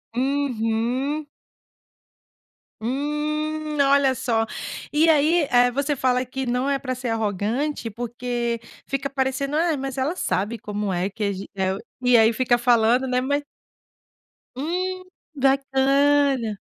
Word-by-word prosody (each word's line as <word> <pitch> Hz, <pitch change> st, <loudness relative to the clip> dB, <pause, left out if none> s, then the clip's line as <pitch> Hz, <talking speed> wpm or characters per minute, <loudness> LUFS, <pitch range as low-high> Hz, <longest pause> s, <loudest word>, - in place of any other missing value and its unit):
Uhum. 260 Hz, +1 st, 0 dB, 1.6 s
Hum. 285 Hz, +5 st, -1 dB, 0.6 s
Olha 275 Hz, -1 st, +4 dB
só, 225 Hz, -3 st, 0 dB, 0.5 s
e 305 Hz, +2 st, +3 dB
aí, 310 Hz, +1 st, +4 dB
eh, 245 Hz, 0 st, +5 dB
você 280 Hz, +3 st, 0 dB
fala 255 Hz, -1 st, +1 dB
que 265 Hz, +2 st, -4 dB
não 250 Hz, +2 st, 0 dB
é 280 Hz, -1 st, +1 dB
pra 255 Hz, -2 st, -3 dB
ser 250 Hz, -1 st, -4 dB
arrogante, 225 Hz, +5 st, -1 dB
porque 240 Hz, +1 st, -3 dB, 0.3 s
fica 275 Hz, 0 st, -2 dB
parecendo, 270 Hz, +1 st, -1 dB
"ah, 325 Hz, 0 st, +2 dB
mas 270 Hz, -1 st, -5 dB
ela 290 Hz, +7 st, 0 dB
sabe 225 Hz, -, -1 dB
como 210 Hz, -1 st, -3 dB
é 180 Hz, +2 st, -1 dB
que 210 Hz, +2 st, -5 dB
a 200 Hz, -, +1 dB
ge 195 Hz, 0 st, -6 dB
é 190 Hz, -1 st, 0 dB
o", -, -, -7 dB, 0.2 s
e 250 Hz, -1 st, +6 dB
aí 225 Hz, 0 st, +6 dB
fica 240 Hz, +1 st, +2 dB
falando, 240 Hz, +1 st, +3 dB
né? 250 Hz, 0 st, +1 dB
Ma 285 Hz, +3 st, 0 dB, 1.2 s
Hum, 365 Hz, +6 st, -2 dB, 0.3 s
bacana. 270 Hz, -3 st, +2 dB
260 Hz, 135 wpm, -23 LUFS, 235-280 Hz, 1.6 s, e